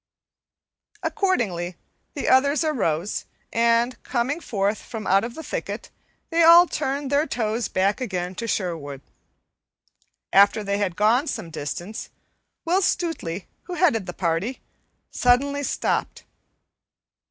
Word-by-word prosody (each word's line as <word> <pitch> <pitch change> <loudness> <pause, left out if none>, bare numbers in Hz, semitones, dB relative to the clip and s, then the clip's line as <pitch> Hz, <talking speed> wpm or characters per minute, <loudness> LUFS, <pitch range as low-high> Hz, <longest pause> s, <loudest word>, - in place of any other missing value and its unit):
Accordingly, 190 - 0 0.4
the 285 - -3
others 280 +4 +4
arose, 205 - -1 0.3
and, 235 +2 +2
coming 260 +5 -1
forth 205 -7 -1
from 220 -3 -7
out 195 +1 +4
the 320 - -7
thicket, - - -5 0.4
they 335 +1 +3
all 335 +2 +9
turned 280 -4 -3
their 290 +3 +2
toes 225 0 -1
back 195 +6 0
again 185 -6 -3
to 230 +5 -5
Sherwood. 160 -10 -3 1.3
After 200 +2 +5
they 200 0 -1
had 190 -4 -1
gone 230 - +3
some 220 - -4
distance, 175 +8 -5 0.6
Will 360 +4 +2
Stutely, 265 - -1 0.2
who 360 - -5
headed 235 - +2
the 175 - -5
party, 180 +9 -1 0.5
suddenly 280 +3 +2
stopped. 285 - -1
230 Hz, 120 wpm, -24 LUFS, 190-285 Hz, 1.3 s, all